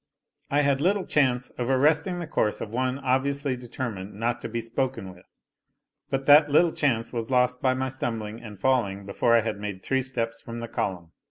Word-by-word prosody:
I 145 +1 +3
had 140 -1 +2
little 190 +3 +2
chance 130 -4 +1
of 120 +1 -1
arresting 150 +6 +3
the 175 - -4
course 110 -9 0
of 105 - -6
one 130 +1 0
obviously 140 +1 0
determined 115 -5 -6
not 115 +3 -1
to - - -5
be 115 +1 -2
spoken 115 -4 -3
with; 90 0 -19 0.8
but 135 0 -2
that 145 +1 +7
little 165 +4 +4
chance 120 -8 0
was 115 -1 -3
lost 125 -1 +2
by 130 -1 +2
my 130 +1 -1
stumbling 115 -4 -4
and 105 -3 -10
falling 100 -4 0
before 115 +4 +2
I 115 - +5
had 110 -2 -3
made 100 -2 -6
three 135 0 +1
steps 115 -3 -3
from 115 0 -7
the 115 - -5
column. 90 -6 -3
125 Hz, 195 wpm, -26 LUFS, 115-135 Hz, 0.8 s, that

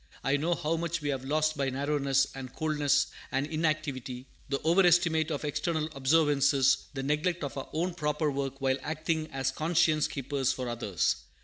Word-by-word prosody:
I 135 - +2
know 165 +4 +1
how 165 0 -1
much 170 0 -2
we 145 - -1
have 135 -2 -2
lost 155 +3 +1
by 140 -2 0
narrowness 140 0 +1
and 130 -2 -7
coldness 150 -2 +1 0.3
and 135 +1 0
inactivity, 150 -5 -2 0.2
the 140 0 0
overestimate 170 -2 +4
of 150 -1 -3
external 155 +1 -1
observances, 140 -2 +3
the 135 - -3
neglect 155 +4 0
of 140 - -4
our 135 - -6
own 175 +3 -1
proper 150 -2 0
work 135 -1 -3
while 135 -1 +1
acting 155 +1 -2
as 135 0 -1
conscience 155 +1 +2
keepers 135 -1 -1
for 130 -1 -4
others. 110 -8 0
145 Hz, 170 wpm, -29 LUFS, 135-160 Hz, 0.3 s, overestimate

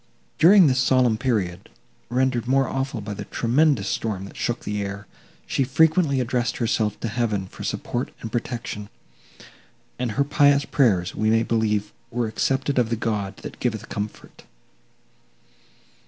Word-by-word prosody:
During 185 +2 +8
this 130 -3 +3
solemn 130 -3 +3
period, 105 -9 -1 0.4
rendered 125 -1 0
more 135 +1 +3
awful 135 -3 -3
by 105 0 -5
the 100 0 -7
tremendous 125 -2 +2
storm 100 -3 -2
that - - -12
shook 120 0 -2
the 105 0 -2
air, 100 0 -5 0.4
she 135 - 0
frequently 150 +1 +3
addressed 125 -1 -1
herself 110 -3 0
to - - -1
Heaven 110 -4 -1
for - - -10
support 120 +2 -3
and 110 - -7
protection, 115 -4 -4 1.1
and 125 -3 -1
her 140 - +2
pious 145 0 +3
prayers, 100 -9 +2
we 110 - 0
may 115 +1 +3
believe, 105 -3 0 0.2
were 120 0 -1
accepted 135 +5 0
of 120 -2 +1
the 120 - 0
God, 105 -3 -2
that - - -8
giveth 110 -4 -2
comfort. 105 0 -7
120 Hz, 150 wpm, -23 LUFS, 105-130 Hz, 1.1 s, During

